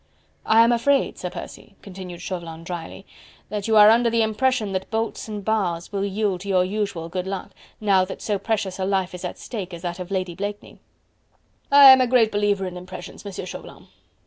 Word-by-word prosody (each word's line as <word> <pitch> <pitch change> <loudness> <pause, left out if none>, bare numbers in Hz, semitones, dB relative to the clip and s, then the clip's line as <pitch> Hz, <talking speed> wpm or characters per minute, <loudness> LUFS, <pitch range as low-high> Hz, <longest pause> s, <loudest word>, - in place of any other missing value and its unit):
"I 225 +1 +6
am 230 - +3
afraid, 265 +4 +1
Sir 180 - -4
Percy," 175 +2 -10
continued 185 -3 -9
Chauvelin 165 -3 -6
drily, 175 +2 -7 0.4
"that 210 -1 -4
you 220 -1 +3
are 210 0 +9
under 235 +1 +4
the 230 0 +2
impression 220 0 0
that 190 0 -3
bolts 225 0 -3
and 210 -2 -6
bars 185 -6 -1
will 200 -1 -2
yield 200 -2 -1
to 200 - -7
your 185 -1 +3
usual 195 -4 -3
good 180 +2 -4
luck, 195 0 -5 0.3
now 195 -3 +3
that 185 - -8
so 205 -2 -2
precious 200 -4 -2
a - - -1
life 190 -2 0
is 180 - -8
at 180 - -5
stake 190 -7 -6
as 170 - -12
that 175 0 -4
of 180 0 -6
Lady 185 -2 -2
Blakeney." 205 +3 -6 0.9
"I 280 -1 +10
am 260 0 +7
a 255 - +2
greater 235 -3 +3
believer 205 -1 +1
in 180 -1 -6
impressions, 180 0 -9
Monsieur 200 -2 -6
Chauvelin." 185 - -10
195 Hz, 200 wpm, -23 LUFS, 180-220 Hz, 0.9 s, I